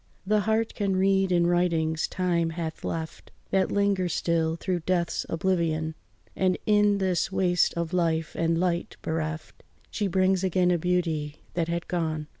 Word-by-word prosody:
The 210 +2 +3
heart 220 +2 0
can 200 -2 -1
read 190 0 +2
in 175 -1 +3
writings 165 -2 +1
time 175 -3 0
hath 160 -1 -5
left, 160 -1 -5 0.2
That 190 -1 +2
linger 200 -3 +1
still 165 0 0
through 180 +1 -2
death's 175 0 -1
oblivion; 165 -2 0 0.4
And 185 -1 +1
in 210 -1 +4
this 190 -2 0
waste 180 -2 +2
of 170 0 -3
life 165 -3 0
and 165 0 +1
light 175 -1 -1
bereft, 155 -1 -4 0.3
She 205 - -1
brings 185 0 +2
again 185 -1 +2
a 175 - +2
beauty 160 -4 -1
that 170 -2 0
had 170 0 -3
gone. 160 -3 -2
175 Hz, 155 wpm, -26 LUFS, 165-190 Hz, 0.4 s, in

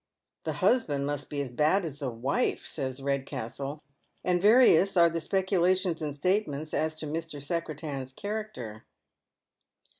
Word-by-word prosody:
" - - -58
The - - -1
husband 145 - +2
must 145 0 -3
be 145 -1 -2
as 130 - -7
bad 155 +9 +2
as 145 -3 -6
the 140 -3 -2
wife," 120 +4 -1
says 130 -3 -4
Eedcastla 140 +1 -3 0.4
and 180 -1 +2
various 200 -4 +6
are 170 -1 +6
the 165 0 -2
speculations 185 -2 +1
and 150 -2 -3
statements 155 -3 -1
as 155 0 0
to 155 - -6
Ml 160 0 -4
Secretan's 150 -4 -4
character. 200 - -6
155 Hz, 145 wpm, -29 LUFS, 140-180 Hz, 0.4 s, various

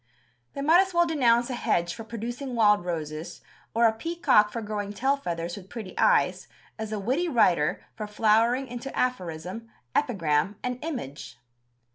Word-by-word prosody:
They 275 - -5
might 330 +5 +6
as 380 -2 -3
well 345 0 +5
denounce 245 -6 +2
a - - -2
hedge 175 -7 0
for 225 - -8
producing 240 +4 -5
wild 210 -4 +4
roses 155 -2 -5 0.3
or 235 +1 +4
a 225 - +4
peacock 225 -5 +2
for 230 - -4
growing 205 -2 -4
tail 265 +7 +1
feathers 170 -9 -4
with 195 -1 -11
pretty 220 -6 -8
eyes - - +2 0.3
as 220 -1 -4
a 215 - -2
witty 260 - 0
writer 175 - +2
for 215 -1 -6
flowering 225 +5 +2
into 245 +2 -6
aphorism, 185 -2 -3 0.3
epigram 190 - +1
and 250 +1 -3
image. 245 - -6
225 Hz, 160 wpm, -27 LUFS, 190-255 Hz, 0.3 s, might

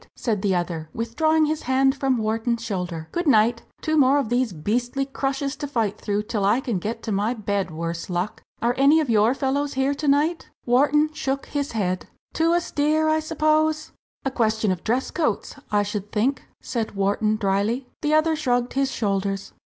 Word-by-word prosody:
said 215 -5 -1
the 195 -2 +1
other, 170 -3 -3
withdrawing 310 +8 +2
his 310 0 -1
hand 265 +1 +3
from 270 -2 +1
Wharton's 225 +1 -1
shoulder 180 -7 -4
"good 345 -1 -2
night! 230 -2 +4 0.2
two 315 - 0
more 280 -1 +5
of 275 -6 0
these 245 -1 +1
beastly 240 - -1
crushes 275 +1 -2
to 290 - -4
fight 225 -7 -1
through 205 0 -1
till 210 -2 -2
I 205 +5 +3
can 235 -8 -2
get 225 +5 -4
to 220 - -3
my 210 +5 0
bed, 200 -3 -1
worse 165 +2 -4
luck! 180 +3 -2 0.2
Are 240 +1 +3
any 285 +4 +6
of 295 -6 0
your 220 +3 +4
fellows 280 +1 -1
here 270 +1 +1
to 290 +1 -4
night?" 300 +4 +2 0.2
Wharton 295 +5 +3
shook 275 -2 -2
his 285 -3 -3
head. 185 -4 -1 0.3
"Too 330 +1 +2
austere, 315 -2 +1
I 315 0 +3
suppose?" 310 0 +1 0.3
"A 270 - 0
question 220 -4 +1
of 180 -2 -3
dress 245 +4 0
coats, 300 - -1
I 205 -1 +3
should 205 0 -5
think," 255 +5 0
said 230 -4 -3
Wharton, 205 +2 +1
drily. 215 +5 0
The 305 -1 +2
other 315 +1 +3
shrugged 245 -5 0
his 275 0 +1
shoulders. 195 -4 -2
245 Hz, 185 wpm, -24 LUFS, 205-285 Hz, 0.3 s, any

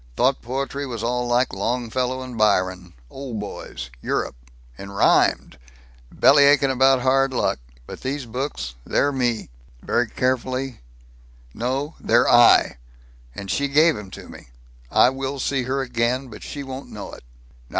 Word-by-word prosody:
Thought 130 +1 +2
poetry 135 +3 -4
was 115 -3 -5
all 125 +1 -1
like 120 +2 +1
Longfellow 125 +4 -2
and 125 -2 -8
Byron. 95 -4 +1 0.2
Old 130 -5 -6
boys. 65 -11 -7
Europe. - - -2 0.4
And 100 0 -10
rhymed 65 - +2 0.5
bellyachin' 140 -1 +5
about 130 0 +4
hard 135 +1 +2
luck. - - 0 0.3
But - - -10
these 135 +1 -3
books 115 - -4
they're 145 - +1
me." 120 - -1 0.3
Very 120 -1 0
carefully: 130 +1 -2 0.7
"No; 135 +6 -2
they're 120 +1 +3
I! 120 - +6 0.6
And 100 -1 -5
she 140 - 0
gave 155 +3 +4
'em 105 -2 -8
to - - -11
me! - - -13 0.4
I 125 - +5
will 135 +1 -4
see 135 -1 -1
her 135 +2 -1
again! 125 +1 -1
But 105 - -11
she 145 - -6
won't 135 0 -8
know - - -8
it. - - -12
125 Hz, 145 wpm, -22 LUFS, 115-135 Hz, 0.7 s, I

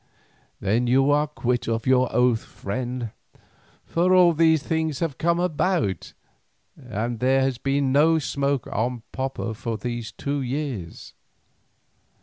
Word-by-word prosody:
"Then 115 +5 +1
you 135 +3 +4
are 150 +1 +3
quit 125 -4 -2
of 115 0 -1
your 130 -1 +3
oath, 125 -2 +3
friend, 120 +2 -5 0.7
for 180 +2 +2
all 175 -2 +6
these 160 -1 +3
things 160 -3 -1
have 155 -6 -3
come 170 +1 +2
about, 175 - -1 0.6
and 120 -3 -4
there 130 +1 +3
has 130 -2 0
been 135 0 0
no 155 +4 +4
smoke 140 -3 -1
on 120 +1 -2
Popo 130 -3 -3
for 115 0 -4
these 120 -1 -5
two 140 +5 -3
years. 130 - -5
130 Hz, 135 wpm, -24 LUFS, 120-150 Hz, 0.7 s, all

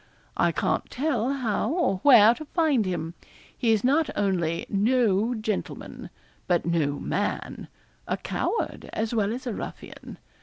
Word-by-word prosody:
I - - +2
can't - - -1
tell 260 -3 -1
how 235 -5 -1
or 325 - +1
where 230 -1 +7
to 310 +5 -9
find 290 - +1
him. 165 -2 -3 0.4
He 235 -3 +1
is 215 -2 +2
not 285 +4 +2
only 175 -5 0
no 220 +1 +2
gentleman, 215 -2 -5 0.4
but 175 -3 +1
no 155 -4 0
man - - -3 0.4
a - - -1
coward 460 - -3
as 220 +1 -2
well 215 -2 +1
as 250 +3 -5
a 240 - -2
ruffian. - - -8
220 Hz, 145 wpm, -26 LUFS, 195-255 Hz, 0.4 s, where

